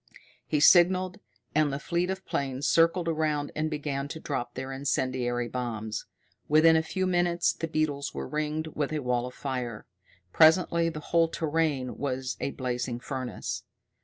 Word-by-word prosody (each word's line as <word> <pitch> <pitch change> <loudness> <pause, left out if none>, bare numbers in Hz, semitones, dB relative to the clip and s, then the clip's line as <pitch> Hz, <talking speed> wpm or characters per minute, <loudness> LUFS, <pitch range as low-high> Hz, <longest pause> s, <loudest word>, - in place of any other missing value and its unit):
He 150 - +1
signalled, 185 +3 +5 0.3
and 150 -1 +3
the 140 - -2
fleet 170 +4 -1
of 190 0 -4
planes 135 0 -2
circled 165 +1 +3
around 155 -3 0
and 155 +1 0
began 145 -2 -3
to 160 - -7
drop 120 -6 -4
their 130 +1 -5
incendiary 130 -3 -1
bombs. 110 -3 -4 0.4
Within 160 +2 +6
a 160 - +4
few 185 +4 -2
minutes 175 -1 +2
the 165 - -4
beetles 155 -2 -1
were - - -5
ringed 155 +1 -2
with 145 -1 -2
a - - 0
wall 125 0 0
of 125 - -10
fire. 125 -5 -4 0.5
Presently 165 +1 +5
the 155 -2 -6
whole 165 -1 +5
terrain 155 -5 -1
was 130 -2 -2
a - - 0
blazing 125 -2 -3
furnace. 130 -1 -4
150 Hz, 160 wpm, -28 LUFS, 130-165 Hz, 0.5 s, Within